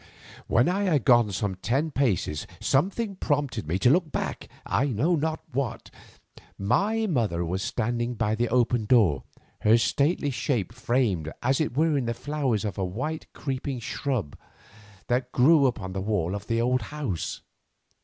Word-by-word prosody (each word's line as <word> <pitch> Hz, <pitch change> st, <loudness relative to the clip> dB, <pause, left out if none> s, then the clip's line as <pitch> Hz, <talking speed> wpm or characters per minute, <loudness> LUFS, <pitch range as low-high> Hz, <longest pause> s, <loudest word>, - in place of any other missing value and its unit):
When 120 Hz, -, +3 dB
I 195 Hz, +3 st, +1 dB
had 150 Hz, -, +1 dB
gone 120 Hz, -4 st, +5 dB
some 100 Hz, 0 st, -1 dB
ten 130 Hz, -, -1 dB
paces 105 Hz, -, 0 dB
something 195 Hz, -, 0 dB
prompted 140 Hz, -, -1 dB
me 85 Hz, +4 st, 0 dB
to 120 Hz, +6 st, +4 dB
look 165 Hz, -1 st, +2 dB
back, -, -, -3 dB, 0.2 s
I 140 Hz, -, +1 dB
know 140 Hz, -, +1 dB
not 160 Hz, +1 st, -1 dB
what. 120 Hz, -3 st, -3 dB, 0.7 s
My 200 Hz, -, +1 dB
mother 110 Hz, -, 0 dB
was 90 Hz, +3 st, -2 dB
standing 120 Hz, +2 st, -1 dB
by 105 Hz, -1 st, 0 dB
the 120 Hz, +1 st, 0 dB
open 120 Hz, -2 st, +2 dB
door, 105 Hz, -, +3 dB, 0.3 s
her 110 Hz, +2 st, +5 dB
stately 145 Hz, +5 st, +1 dB
shape 120 Hz, -, -1 dB
framed 115 Hz, -, 0 dB
as 130 Hz, +4 st, +2 dB
it 145 Hz, -4 st, -2 dB
were 160 Hz, 0 st, +3 dB
in 125 Hz, -, -2 dB
the 115 Hz, 0 st, -2 dB
flowers 135 Hz, -6 st, -1 dB
of 100 Hz, -2 st, -4 dB
a -, -, 0 dB
white 130 Hz, -, -4 dB
creeping 135 Hz, -1 st, -3 dB
shrub 120 Hz, -, -3 dB, 0.7 s
that 125 Hz, +1 st, -1 dB
grew 140 Hz, +2 st, +5 dB
upon 100 Hz, -7 st, -3 dB
the 95 Hz, -, -3 dB
wall 95 Hz, -4 st, -1 dB
of 100 Hz, +1 st, -6 dB
the 115 Hz, 0 st, 0 dB
old 125 Hz, +2 st, +2 dB
house. 115 Hz, -, -4 dB
120 Hz, 165 wpm, -26 LUFS, 105-145 Hz, 0.7 s, gone